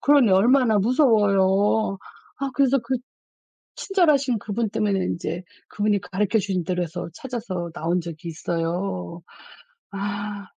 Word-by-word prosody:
그러니 280 Hz, -6 st, +5 dB
얼마나 230 Hz, +2 st, +4 dB
무서워요. 205 Hz, -4 st, +3 dB, 0.4 s
아 275 Hz, 0 st, -2 dB
그래서 275 Hz, -1 st, +3 dB
그 235 Hz, +2 st, -3 dB, 0.8 s
친절하신 295 Hz, -, +2 dB
그분 220 Hz, +2 st, -2 dB
때문에 205 Hz, -2 st, 0 dB
인제 170 Hz, 0 st, -3 dB, 0.3 s
그분이 205 Hz, -1 st, +1 dB
가리켜 200 Hz, +4 st, 0 dB
주신 190 Hz, -3 st, -2 dB
대로 180 Hz, -1 st, -1 dB
해서 175 Hz, +1 st, -6 dB
찾아서 210 Hz, -10 st, -5 dB
나온 170 Hz, +3 st, -1 dB
적이 170 Hz, 0 st, -8 dB
있어요. 165 Hz, -, -3 dB, 0.7 s
아. 205 Hz, 0 st, -4 dB
205 Hz, 275 characters per minute, -23 LUFS, 180-235 Hz, 0.8 s, 그러니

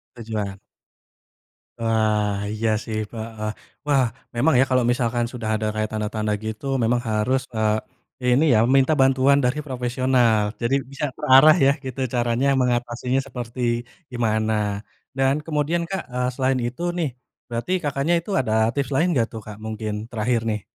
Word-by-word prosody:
Tujuan. 110 Hz, -4 st, -4 dB, 1.2 s
Wah, 110 Hz, -2 st, +1 dB, 0.2 s
iya 110 Hz, +1 st, 0 dB
sih 110 Hz, -1 st, -4 dB
pa 115 Hz, -, -9 dB, 0.2 s
heeh. 105 Hz, 0 st, -2 dB, 0.4 s
Wah, 140 Hz, -3 st, +4 dB, 0.3 s
memang 145 Hz, +6 st, +3 dB
ya, -, -, +7 dB
kalau 130 Hz, -1 st, +3 dB
misalkan 120 Hz, -1 st, 0 dB
sudah 115 Hz, -3 st, -4 dB
ada 110 Hz, 0 st, -1 dB
kayak 110 Hz, 0 st, -1 dB
tanda-tanda 110 Hz, 0 st, -2 dB
gitu 110 Hz, +5 st, -5 dB, 0.2 s
memang 120 Hz, +2 st, +2 dB
harus, 125 Hz, +5 st, +1 dB
eee, 110 Hz, +3 st, -2 dB
ini 135 Hz, +6 st, +4 dB
ya, -, -, +5 dB
meminta 135 Hz, +3 st, +4 dB
bantuan 135 Hz, +1 st, +4 dB
dari 135 Hz, +5 st, +1 dB
profesional. 125 Hz, -3 st, +2 dB, 0.2 s
Jadi, 120 Hz, +3 st, +1 dB, 0.2 s
bisa 145 Hz, +2 st, -3 dB
terarah 150 Hz, +2 st, +7 dB
ya, 140 Hz, -, +6 dB
gitu. 130 Hz, +1 st, -6 dB
Caranya, 120 Hz, +2 st, +1 dB
mengatasinya 125 Hz, +1 st, 0 dB
seperti 120 Hz, 0 st, -7 dB, 0.5 s
gimana? 110 Hz, -2 st, 0 dB, 0.6 s
Dan 135 Hz, +1 st, +3 dB
kemudian, 160 Hz, +2 st, 0 dB
Kak, 195 Hz, -1 st, -2 dB
eee, 125 Hz, 0 st, 0 dB
selain 130 Hz, -1 st, +1 dB
itu 125 Hz, +8 st, -7 dB, 0.2 s
nih. 160 Hz, -5 st, 0 dB, 0.4 s
Berarti, 120 Hz, +9 st, -3 dB
Kakaknya 145 Hz, +3 st, 0 dB
itu 170 Hz, -, -11 dB
ada 110 Hz, -4 st, 0 dB, 0.2 s
tips 140 Hz, 0 st, -2 dB
lain 165 Hz, +6 st, +3 dB
gak 115 Hz, -, +2 dB
tuh, 110 Hz, -, -6 dB
Kak, 105 Hz, -1 st, -8 dB
mungkin? 110 Hz, -1 st, -4 dB, 0.2 s
Terakhir 115 Hz, +1 st, 0 dB
nih. 105 Hz, -2 st, -3 dB
120 Hz, 155 wpm, -23 LUFS, 110-135 Hz, 1.2 s, ya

